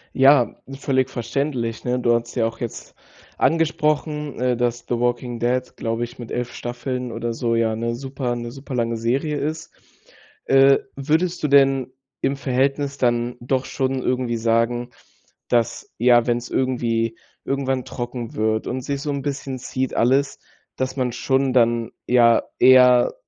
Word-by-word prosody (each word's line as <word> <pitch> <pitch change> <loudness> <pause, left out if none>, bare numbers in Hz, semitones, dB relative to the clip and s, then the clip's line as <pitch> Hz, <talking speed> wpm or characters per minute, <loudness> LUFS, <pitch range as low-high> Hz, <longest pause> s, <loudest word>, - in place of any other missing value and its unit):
Ja, 135 -2 +5
völlig 130 -1 0
verständlich. 120 -1 -3
Ne, 125 0 0
du 120 -1 +3
hattest 115 0 -2
ja 115 -3 +2
auch 115 0 -4
jetzt 120 - -7 0.4
angesprochen, 150 -2 0
äh, 125 -1 +1
dass 120 0 -1
The 120 - 0
Walking 120 0 -1
Dead, 125 +2 -1
glaube 115 +1 -2
ich 120 +2 -8
mit 120 - -8
11 120 0 -3
Staffeln 125 0 -4
oder 115 0 -3
so 115 0 -1
ja, 115 -1 +1
'ne 115 +1 -2
super 130 -1 -3
'ne 120 0 -5
super 135 0 -8
lange 115 -1 0
Serie 135 +7 -1
ist. 155 +2 -4 0.7
Äh, 135 0 +6 0.2
würdest 160 +6 0
du - - +3
denn 135 -2 +3 0.3
im 140 - 0
Verhältnis 140 +1 0
dann 120 -1 0
doch 130 +2 -1
schon 130 -1 -2
irgendwie 125 -2 -1
sagen, 115 +2 +1 0.6
dass, 120 -2 0
ja, 120 0 +4
wenn's 120 0 -1
irgendwie 115 -3 0 0.3
irgendwann 135 -2 -1
trocken 120 -1 -6
wird 110 0 0
und 130 +1 -3
sich 140 +2 -3
so 145 - -2
'n 140 -1 -3
bisschen 135 -2 -4
zieht 130 +1 -3
alles, 135 +4 +2 0.4
dass 130 +1 -3
man 125 -2 -1
schon 130 +2 +1
dann, 115 -2 +2
ja, 120 -2 +4 0.2
eher 125 -1 +6
125 Hz, 155 wpm, -22 LUFS, 120-135 Hz, 0.7 s, Äh